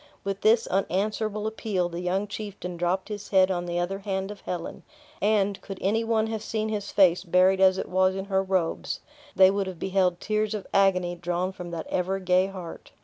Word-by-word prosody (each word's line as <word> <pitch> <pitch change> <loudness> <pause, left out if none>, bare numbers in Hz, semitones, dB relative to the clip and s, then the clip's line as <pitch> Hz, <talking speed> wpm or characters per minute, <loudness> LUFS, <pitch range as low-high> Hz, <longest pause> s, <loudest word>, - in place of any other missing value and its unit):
With 195 0 -3
this 225 +1 +4
unanswerable 210 +3 -1
appeal, 215 -4 -1
the 170 0 -6
young 180 +3 0
chieftain 200 -4 -6
dropped 175 +3 -1
his 205 -1 -6
head 190 -1 +4
on 175 -1 -2
the 175 0 -2
other 180 +3 -1
hand 195 -1 -3
of 205 - -10
Helen; 175 -2 -5 0.4
and, 205 -1 +1
could 195 -1 -7
any 220 +4 +1
one 225 -1 +1
have 220 -1 -3
seen 220 0 -2
his 205 -2 -3
face 180 -3 +4
buried 185 +1 +3
as 190 0 +5
it - - -3
was 185 +1 +2
in 195 0 -4
her 190 -1 +1
robes, 185 -3 -1 0.3
they 190 0 +7
would 200 -1 -1
have 185 -2 -6
beheld 185 -1 +1
tears 215 0 -1
of 205 - -5
agony 185 -3 +3
drawn 175 +1 -2
from 180 -2 -8
that 170 -1 -5
every 190 +2 -1
gay 185 +1 +3
heart. 185 -4 -9
190 Hz, 205 wpm, -26 LUFS, 180-205 Hz, 0.4 s, they